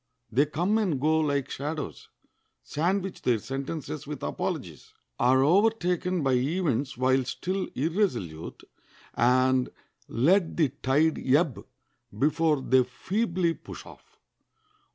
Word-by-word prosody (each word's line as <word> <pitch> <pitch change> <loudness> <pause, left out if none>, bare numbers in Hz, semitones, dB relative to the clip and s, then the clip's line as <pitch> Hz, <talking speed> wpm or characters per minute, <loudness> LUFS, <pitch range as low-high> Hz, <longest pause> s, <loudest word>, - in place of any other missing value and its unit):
They 140 +6 +3
come 180 +9 +1
and 180 -11 0
go 155 +3 +2
like 140 -3 0
shadows, 145 - -5 0.5
sandwich 185 - -1
their 120 -3 +2
sentences 135 - -5
with - - -6
apologies, - - -4 0.2
are 130 +2 +4
overtaken 180 -1 +2
by 135 - +2
events 140 -1 0
while 130 +1 +2
still 185 +9 -3
irresolute, 125 - -2 0.5
and 130 +1 +3 0.4
let 165 - +2
the 155 -5 +3
tide 145 +4 +1 0.2
ebb 150 -5 +1 0.5
before 150 +1 +2
they 130 0 +4
feebly 175 - -1
push - - -11
off. - - -16
150 Hz, 110 wpm, -27 LUFS, 130-175 Hz, 0.5 s, are